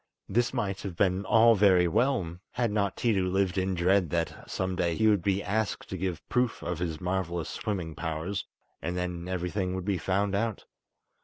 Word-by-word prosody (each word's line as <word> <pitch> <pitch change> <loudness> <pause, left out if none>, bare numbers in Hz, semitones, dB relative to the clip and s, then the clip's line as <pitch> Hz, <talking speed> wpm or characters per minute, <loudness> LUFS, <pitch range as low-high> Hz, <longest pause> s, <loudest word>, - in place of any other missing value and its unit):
This 120 +4 +1
might 95 -2 -2
have 95 -4 -5
been 95 +1 +1
all 115 +2 +6
very 95 -4 +5
well, 105 -5 +1 0.2
had 120 -3 0
not 100 -2 0
Tiidu 95 -6 +1
lived 95 -1 +1
in 95 0 0
dread 90 0 +3
that 85 +1 -3
some 95 0 -2
day 85 -2 0
he 110 - +3
would 105 -4 +4
be 100 +2 0
asked 110 +1 -1
to - - -4
give 90 -4 -3
proof 125 -1 0
of 90 -2 -3
his 80 -3 -2
marvellous 90 -2 -2
swimming 90 -7 -3
powers, 80 +5 -3 0.3
and 90 +2 -3
then 90 -1 -3
everything 90 +1 -2
would 95 -1 -4
be 100 -3 0
found 100 +3 0
out. 110 +1 -1
95 Hz, 185 wpm, -29 LUFS, 90-100 Hz, 0.3 s, all